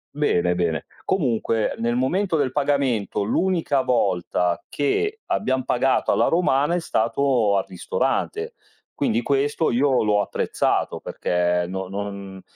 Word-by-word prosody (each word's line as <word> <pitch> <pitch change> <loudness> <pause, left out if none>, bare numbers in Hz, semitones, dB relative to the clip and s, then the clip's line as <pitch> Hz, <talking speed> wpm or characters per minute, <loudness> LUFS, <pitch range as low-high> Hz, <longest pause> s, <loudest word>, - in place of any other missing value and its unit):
Bene, 90 -12 +1
bene. 85 -4 -1 0.2
Comunque 115 - 0
nel 120 +1 0
momento 170 +9 0
del 140 -5 +1
pagamento, 135 -8 0
l'unica 160 - +1
volta 90 -7 0
che 415 - -1
abbiam 130 - 0
pagato 130 +2 +1
alla - - +3
romana 165 -2 +2
è - - +1
stato 115 -4 +1
al 95 - +2
ristorante. 90 -2 -2 0.4
Quindi 115 +2 0
questo 145 +4 +1
io 130 0 +2
l'ho 105 -1 +2
apprezzato - - -1
perché 90 0 0
no 95 0 -4
non 100 -1 -6
120 Hz, 125 wpm, -23 LUFS, 100-145 Hz, 0.4 s, alla